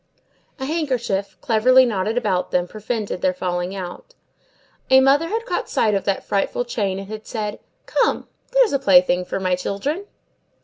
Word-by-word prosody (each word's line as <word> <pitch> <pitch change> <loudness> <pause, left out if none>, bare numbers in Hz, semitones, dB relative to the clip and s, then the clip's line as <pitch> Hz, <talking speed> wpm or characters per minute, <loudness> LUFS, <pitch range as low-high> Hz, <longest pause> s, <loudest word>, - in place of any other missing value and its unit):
A 265 - -3
handkerchief, 250 -11 -2
cleverly 255 +3 +5
knotted 215 0 -1
about 200 -7 0
them, 180 0 0
prevented 215 -2 -4
their 185 -1 +1
falling 180 +1 -2
out. 190 - -8 0.7
A 265 - +7
mother 275 +5 +4
had 455 +5 -2
caught - - -3
sight 215 - +2
of 195 - -1
that 195 -1 0
frightful 200 +4 -1
chain, 200 -5 -2
and 195 0 -7
had 215 +1 -8
said, 210 -2 -4 0.3
"Come! - - 0 0.2
there's - - +4
a 275 - +2
plaything 180 -5 +4
for 190 - -3
my 185 -1 +1
children." 275 - -3
215 Hz, 165 wpm, -21 LUFS, 190-265 Hz, 0.7 s, A